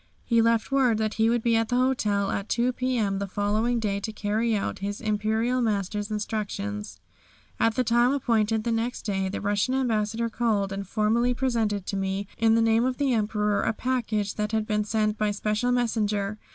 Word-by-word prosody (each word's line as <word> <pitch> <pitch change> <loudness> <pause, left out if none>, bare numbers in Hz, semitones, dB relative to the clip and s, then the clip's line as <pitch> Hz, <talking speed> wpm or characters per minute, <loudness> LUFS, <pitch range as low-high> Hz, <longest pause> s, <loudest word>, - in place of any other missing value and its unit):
He 230 -1 +3
left 230 +2 +1
word 260 -5 +3
that 215 -1 -1
he 225 0 +2
would 235 -1 +1
be 235 -1 +3
at 225 0 +1
the 245 - 0
hotel 215 -6 +1
at 195 - -3
2 245 +1 +1
p.m. 235 -7 0
the 200 - -3
following 215 +5 0
day 200 -3 -1
to 215 +2 -4
carry 220 +2 0
out 200 - -3
his 200 +1 -4
Imperial 220 +3 0
Master's 205 -1 -1
instructions. 105 - -4 0.6
At 225 -1 +2
the 255 - +2
time 240 +2 +3
appointed 225 -5 +1
the 235 - -1
next 230 +2 -2
day 195 -2 -1
the 195 - -4
Russian 205 +5 0
Ambassador 230 -3 0
called 220 -4 0
and 195 -1 -5
formally 230 +4 +1
presented 225 -6 0
to 200 - -3
me, 195 +1 -2
in 225 0 +4
the 230 - +3
name 225 +1 +3
of 255 0 -1
the 275 -3 +1
Emperor, 210 -2 +1
a - - 0
package 220 -4 -1
that 210 +1 -2
had 220 -1 +1
been 210 -1 0
sent 215 0 0
by 215 0 +2
special 210 +4 0
messenger. 215 -4 0
220 Hz, 195 wpm, -26 LUFS, 205-235 Hz, 0.6 s, in